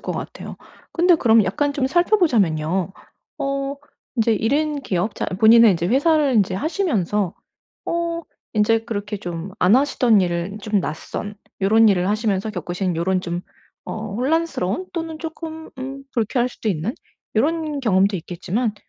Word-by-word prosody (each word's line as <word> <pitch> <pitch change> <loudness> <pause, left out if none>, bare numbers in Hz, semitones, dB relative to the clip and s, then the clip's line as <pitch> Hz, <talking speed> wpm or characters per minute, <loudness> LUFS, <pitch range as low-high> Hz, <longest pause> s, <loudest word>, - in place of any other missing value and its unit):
것 - - -4
같아요. - - -7 0.4
근데 350 +1 +4
그럼 225 -7 +4
약간 285 +11 0
좀 280 -2 0
살펴보자면요. 200 - +2 0.5
어 275 0 -2 0.4
인제 225 -1 +3
1 225 +4 0
인 300 0 0
기업 195 -3 -1
자 - - -3
본인의 220 +3 +6
인제 170 -1 -1
회사를 290 - +3
인제 195 -3 +2
하시면서 210 - 0 0.5
어 335 0 -1 0.3
인제 220 +1 +3
그렇게 210 -2 -4
좀 175 -1 -6
안 180 +4 +5
하시던 250 -5 +3
일을 175 +3 -2
좀 210 -1 +1
낯선 185 +5 -5 0.3
요런 220 +3 +5
일을 185 -2 +2
하시면서 210 -1 0
겪으신 180 -1 -3
요런 185 +2 +1
좀 175 -1 -3 0.4
어 215 -2 -5
혼란스러운 280 - -1
또는 325 -2 -4
쪼끔 320 0 -7
음 270 +1 -6
불쾌할 240 +2 0
수도 230 - -5
있는 190 - -1 0.4
요런 305 +3 0
경험도 200 -4 +2
있겠지만 190 +6 -3
220 Hz, 300 characters per minute, -21 LUFS, 190-285 Hz, 0.5 s, 본인의